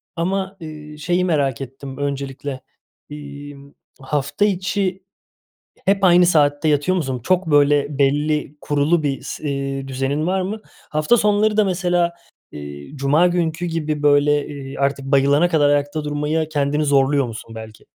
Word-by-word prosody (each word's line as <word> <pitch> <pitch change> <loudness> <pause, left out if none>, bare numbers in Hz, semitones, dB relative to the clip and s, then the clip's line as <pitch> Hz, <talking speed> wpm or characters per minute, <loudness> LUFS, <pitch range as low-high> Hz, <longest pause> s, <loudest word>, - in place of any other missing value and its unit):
ama, 190 +3 -2
iii, 150 -1 -10
şeyi 175 +3 0
merak 140 -6 0
ettim 135 +1 -8
öncelikle, 140 -1 -4 0.5
iii, 145 -1 -9 0.4
hafta 145 +8 0
içi 190 -1 -1 0.8
hep 195 0 +2
aynı 180 -1 +6
saatte 150 -2 +2
yatıyor 150 +5 +2
musun? 130 -6 -2
Çok 185 -2 +1
böyle 145 -1 +3
belli 150 +1 +1
kurulu 150 +3 +1
bir 140 -2 -1
s, - - -7
eee, 135 -1 -3
düzenin 135 +4 -2
var 190 0 +1
mı? 210 +4 -4 0.3
Hafta 155 +11 +2
sonları 210 +1 +2
da 215 - +4
mesela, 175 -2 +1 0.4
iii, 70 - -9
cuma 145 +6 +3
günkü 175 -1 -1
gibi 155 -3 -2
böyle, 145 0 +3
iii, 140 -2 -8
artık 140 0 0
bayılana 140 +5 +3
kadar 150 -4 +3
ayakta 145 +1 0
durmaya 150 +2 -1
kendini 150 0 0
zorluyor 140 -1 +3
musun 115 0 -9
belki? 110 -1 -10
150 Hz, 145 wpm, -20 LUFS, 140-175 Hz, 0.8 s, aynı